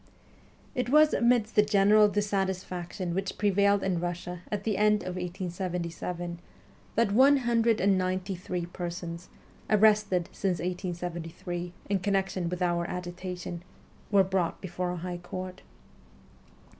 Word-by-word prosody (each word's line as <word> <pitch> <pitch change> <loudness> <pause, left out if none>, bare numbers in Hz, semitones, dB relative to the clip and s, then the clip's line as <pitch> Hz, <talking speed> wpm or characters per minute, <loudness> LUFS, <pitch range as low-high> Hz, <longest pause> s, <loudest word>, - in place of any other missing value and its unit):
It 250 -1 -1
was 305 +2 +6
amidst 235 -2 +3
the 210 - +7
general 210 0 +5
dissatisfaction 190 -3 -2
which 195 +1 -3
prevailed 200 0 +3
in 185 -3 0
Russia 175 0 -4
at 205 -1 -2
the 215 -1 0
end 210 +1 +3
of - - -4
1877, 175 -1 -4 0.6
that 230 -2 +3
one 270 +6 +6
hundred 235 -3 +2
and 195 -1 +3
ninety 185 +1 -1
three 180 -1 -4
persons, 175 -1 -6 0.4
arrested 210 -4 +4
since 185 -3 -1
1873, 175 -1 -4
in 200 -1 +1
connection 190 -2 0
with 180 +1 -2
our 170 -1 0
agitation, 180 -1 -5 0.5
were 200 -2 +5
brought 190 -3 -1
before 180 -1 -3
a 180 - -3
high 175 +1 -5
court. 185 +1 -7
185 Hz, 130 wpm, -29 LUFS, 175-205 Hz, 0.6 s, the